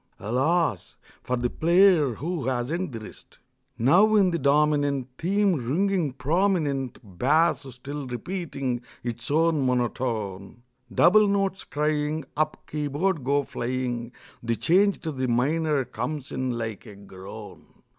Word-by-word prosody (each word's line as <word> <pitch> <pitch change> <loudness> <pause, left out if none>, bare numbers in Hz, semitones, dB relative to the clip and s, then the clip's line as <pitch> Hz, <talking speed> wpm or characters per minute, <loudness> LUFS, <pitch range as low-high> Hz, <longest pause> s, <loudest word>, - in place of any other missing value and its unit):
(Alas! 130 - 0 0.3
for 125 - -1
the 120 0 0
player 170 - +4
who 165 0 -3
hasn't 135 +8 -1
the 115 - -6
wrist!) 110 - -13 0.4
Now 185 - +5
in 195 -3 +4
the 170 - -1
dominant 145 -2 +2
Theme 200 +3 +2
ringing 165 +3 0
prominent, 145 -2 0 0.2
Bass 155 +6 +3 0.2
still 140 +2 -6
repeating 135 - -4 0.2
its 120 -1 -4
one 160 -1 +2
monotone, 120 -4 -2 0.3
Double 210 +3 +5
notes 195 -1 0
crying, 150 0 -1
Up 155 0 -1
keyboard 150 +3 -1
go 140 +2 +2
flying, 120 -2 -3 0.3
The 115 0 -1
change 190 - +2
to 160 - -3
the 130 -2 -2
minor 145 +3 +1
comes 150 0 -5
in 130 -2 -2
like 110 -3 -5
a 105 - -11
groan. 100 +2 -12
145 Hz, 125 wpm, -25 LUFS, 125-170 Hz, 0.4 s, Now